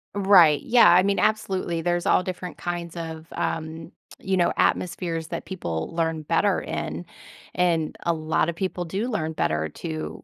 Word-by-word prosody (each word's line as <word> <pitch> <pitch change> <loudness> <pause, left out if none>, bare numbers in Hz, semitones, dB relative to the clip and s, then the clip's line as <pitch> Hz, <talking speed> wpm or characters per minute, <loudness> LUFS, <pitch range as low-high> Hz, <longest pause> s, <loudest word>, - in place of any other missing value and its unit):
Right. 190 -7 +6
Yeah, 240 0 +6
I 175 +1 +7
mean, 200 +1 +1
absolutely, 190 -6 0
there's 175 +1 0
all - - +4
different 180 0 -6
kinds 175 -1 -5
of, 160 -1 -6
um, 160 +1 -4 0.3
you 190 -1 -1
know, 175 -1 +2
atmospheres 170 -2 0
that 170 - -5
people 80 - -4
learn 165 -1 0
better 150 - +1
in. - - -4 0.5
And 170 -3 +1
a 170 - +2
lotta 160 +1 0
people 180 0 -3
do 195 +8 -2
learn 160 -9 -2
better 80 - -1
to 80 0 -6
170 Hz, 160 wpm, -24 LUFS, 160-185 Hz, 0.5 s, I